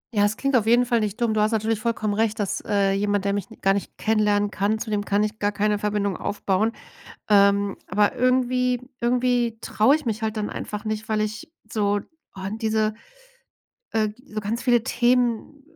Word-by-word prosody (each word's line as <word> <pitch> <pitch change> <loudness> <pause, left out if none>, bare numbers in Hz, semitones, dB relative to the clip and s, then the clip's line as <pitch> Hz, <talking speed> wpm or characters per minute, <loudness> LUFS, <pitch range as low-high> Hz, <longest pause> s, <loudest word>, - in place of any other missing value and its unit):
Ja, 205 - +3
das 205 +1 +2
klingt 275 -1 0
auf 220 -2 +2
jeden 240 +2 +5
Fall 235 -2 +2
nicht 215 +2 -3
dumm. 230 -2 +1
Du 215 - +1
hast 215 +2 +2
natürlich 220 0 0
vollkommen 215 -2 -1
recht, 220 +1 0
dass, 200 -2 -1
äh, 200 -1 +2
jemand, 205 0 0
der 200 - +1
mich 200 -1 -3
gar 195 0 +3
nicht 200 - -4
kennenlernen 210 -2 +1
kann. 205 +2 0
Zudem 210 -2 -2
kann 205 +1 +1
ich 215 +1 -3
gar 205 0 +1
keine 210 0 0
Verbindung 205 -2 -1
aufbauen. 205 +2 0 0.6
Ähm, 200 -1 +4
aber 205 +5 +2
irgendwie 250 0 +1 0.2
irgendwie 240 -1 +1
traue 225 +8 +3
ich 310 - -5
mich 220 0 -2
halt 220 0 -1
dann 210 - -2
einfach 210 +1 -5
nicht, 215 0 -3
weil 215 -1 +1
ich 215 +7 -4 0.2
so. 205 -1 +1 0.4
Oh, - - -7
diese, 220 -1 0 1.0
äh 215 -1 +1 0.2
so 215 -5 -5
ganz 220 +3 -3
viele 240 -3 +3
Themen 245 +3 +1
215 Hz, 190 wpm, -24 LUFS, 205-235 Hz, 1.0 s, jeden